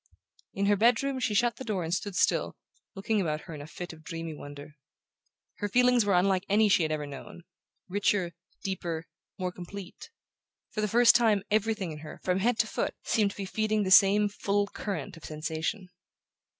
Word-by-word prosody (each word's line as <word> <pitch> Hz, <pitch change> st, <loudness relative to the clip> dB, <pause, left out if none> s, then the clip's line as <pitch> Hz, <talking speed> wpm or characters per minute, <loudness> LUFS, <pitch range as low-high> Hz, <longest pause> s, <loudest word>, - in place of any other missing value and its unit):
In 200 Hz, -, 0 dB
her 205 Hz, 0 st, +4 dB
bedroom 245 Hz, +5 st, +2 dB
she 220 Hz, -4 st, 0 dB
shut 240 Hz, +3 st, +2 dB
the -, -, -6 dB
door 210 Hz, -7 st, -2 dB
and 165 Hz, +1 st, -2 dB
stood 195 Hz, +1 st, -2 dB
still, -, -, +1 dB, 0.4 s
looking 205 Hz, +2 st, 0 dB
about 155 Hz, -3 st, -1 dB
her 165 Hz, -, -10 dB
in 150 Hz, -, -7 dB
a 145 Hz, -, -9 dB
fit 175 Hz, +1 st, -7 dB
of 160 Hz, -1 st, -15 dB
dreamy 165 Hz, 0 st, -5 dB
wonder. 145 Hz, 0 st, -10 dB, 0.9 s
Her 205 Hz, -, -2 dB
feelings 250 Hz, 0 st, +4 dB
were 200 Hz, -2 st, +3 dB
unlike 185 Hz, 0 st, +3 dB
any 210 Hz, +1 st, +4 dB
she 190 Hz, -, +4 dB
had 155 Hz, -1 st, 0 dB
ever 150 Hz, -1 st, -2 dB
known: 145 Hz, +4 st, -10 dB, 0.4 s
richer, 195 Hz, -2 st, +1 dB, 0.3 s
deeper, 170 Hz, -4 st, -3 dB, 0.3 s
more 185 Hz, -2 st, -2 dB
complete. 190 Hz, -, -9 dB, 0.6 s
For 215 Hz, -, -2 dB
the 210 Hz, -, +1 dB
first 235 Hz, +3 st, +6 dB
time 220 Hz, -5 st, +3 dB
everything 215 Hz, -4 st, 0 dB
in 150 Hz, -, -8 dB
her, 155 Hz, 0 st, -10 dB
from 180 Hz, 0 st, +1 dB
head 230 Hz, +3 st, +2 dB
to 225 Hz, -, +2 dB
foot, -, -, -2 dB
seemed 210 Hz, -3 st, +2 dB
to -, -, -11 dB
be 200 Hz, -, -4 dB
feeding 215 Hz, +2 st, 0 dB
the 190 Hz, -, -2 dB
same 200 Hz, +2 st, +7 dB
full 205 Hz, 0 st, 0 dB
current 195 Hz, -7 st, -5 dB
of 165 Hz, -, -12 dB
sensation. 160 Hz, +5 st, -3 dB
195 Hz, 190 wpm, -29 LUFS, 165-215 Hz, 0.9 s, same